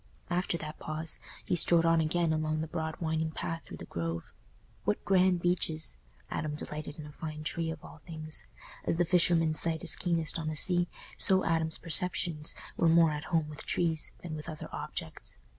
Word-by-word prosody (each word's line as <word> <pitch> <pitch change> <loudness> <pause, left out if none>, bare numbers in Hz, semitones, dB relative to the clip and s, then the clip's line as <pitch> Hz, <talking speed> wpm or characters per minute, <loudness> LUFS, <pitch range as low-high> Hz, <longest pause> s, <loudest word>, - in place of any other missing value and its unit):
After 175 -1 0
that 155 -1 -7
pause, 155 +1 -2 0.3
he - - +1
strode 170 0 +4
on 165 0 +4
again 160 +1 +1
along 155 0 -1
the - - -2
broad 160 0 -4
winding 160 -1 -1
path 165 +1 -4
through - - -10
the - - -8
Grove. 85 0 -5 0.5
What 105 - -1
grand 185 -2 +3
beeches! 160 - +1 0.4
Adam 150 -1 -2
delighted 150 0 -6
in 155 - -8
a 150 - -10
fine 155 0 -7
tree 165 +1 -2
of 160 -1 -7
all - - -12
things; 155 0 -5 0.4
as - - 0
the 175 +1 +2
fisherman's 165 -2 +4
sight 165 -1 +3
is - - +7
keenest 170 -2 0
on 160 - -4
the 155 - -2
sea, 175 +2 +3 0.3
so 190 -1 +5
Adam's 160 -1 0
perceptions 165 -2 +3 0.2
were 165 - +3
more 165 -1 +5
at 150 +1 -5
home 165 -3 0
with 150 -1 -8
trees 160 -3 0
than 165 -3 -6
with 150 - -7
other 155 - -7
objects. - - -6
160 Hz, 190 wpm, -30 LUFS, 155-170 Hz, 0.5 s, is